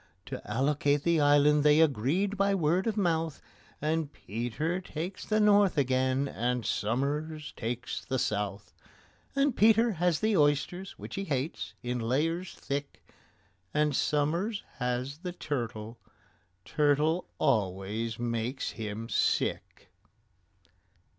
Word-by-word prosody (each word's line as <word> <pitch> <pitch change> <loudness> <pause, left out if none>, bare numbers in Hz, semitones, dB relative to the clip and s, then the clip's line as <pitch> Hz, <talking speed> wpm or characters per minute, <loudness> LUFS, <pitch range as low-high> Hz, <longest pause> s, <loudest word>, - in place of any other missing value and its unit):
To - - -6
allocate 145 +4 +1
the 170 -2 +3
island 145 0 +5
they 150 +1 +6
agreed 160 - +2
by 200 0 +2
word 175 +3 +1
of 220 -1 -1
mouth, 165 -5 0 0.4
And 155 0 -1
PETER 125 - -3
takes 180 +2 -6
the 215 0 +2
north 205 -4 +4
again, 130 0 +2
and 125 -2 -1
SOMERS 145 +8 -2
takes 120 +2 -4
the 130 - -2
south; 105 -3 -2 0.6
And 275 -2 +2
PETER 225 +2 +5
has 175 -3 +1
the 215 -1 +2
oysters, 150 +5 +1
which - - -9
he 195 - -3
hates, 140 0 -3
in 125 0 -2
layers 160 +10 -1
thick, 140 0 -5 0.7
And 150 -2 +2
SOMERS 170 +11 0 0.2
has 125 +3 -2
the 180 0 -5
turtle—turtle 125 - -2
always 110 -3 0
makes 120 +2 -2
him 110 0 -5
sick. - - -1
145 Hz, 115 wpm, -29 LUFS, 120-170 Hz, 0.7 s, they